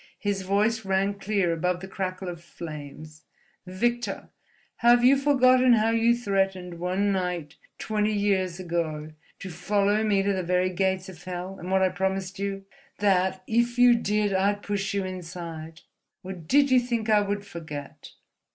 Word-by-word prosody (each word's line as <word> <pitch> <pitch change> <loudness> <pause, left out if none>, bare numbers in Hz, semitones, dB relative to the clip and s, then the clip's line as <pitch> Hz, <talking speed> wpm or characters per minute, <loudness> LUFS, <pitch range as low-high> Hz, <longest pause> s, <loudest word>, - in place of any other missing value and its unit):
His 200 -1 -2
voice 210 +4 +1
rang 195 +1 +1
clear 195 -4 0
above 180 +2 -1
the 190 - -8
crackle 190 -1 -4
of 170 -1 -7
flames: 155 -2 -9 0.5
"Victor! 240 +6 -2 0.5
have 240 0 +5
you 265 +2 +7
forgotten 255 -3 +4
how 225 0 +3
you 230 +1 +3
threatened 195 -6 -1
one 185 +3 0
night, 180 -5 -3 0.2
twenty 215 0 -1
years 195 -4 0
ago, 165 -4 -3 0.3
to 195 - -8
follow 200 +4 +1
me 200 -3 +2
to 200 0 +1
the 190 - -1
very 180 +1 +1
gates 190 0 -1
of 175 -3 -12
Hell, 180 +1 -5
and 180 - -7
what 190 0 +3
I 185 - +4
promised 190 +1 -2
you—that, 195 -2 -1
if 235 +3 +1
you 245 0 +7
did, 210 -3 0
I'd 200 +2 +1
push 200 -1 -2
you 195 -1 0
inside? 170 -3 -7 0.4
Or 190 +1 -6
did 265 - +2
you 255 - +6
think 235 -2 -2
I 215 -1 +4
would 205 0 -3
forget?" 160 -7 -9
195 Hz, 160 wpm, -26 LUFS, 180-210 Hz, 0.5 s, you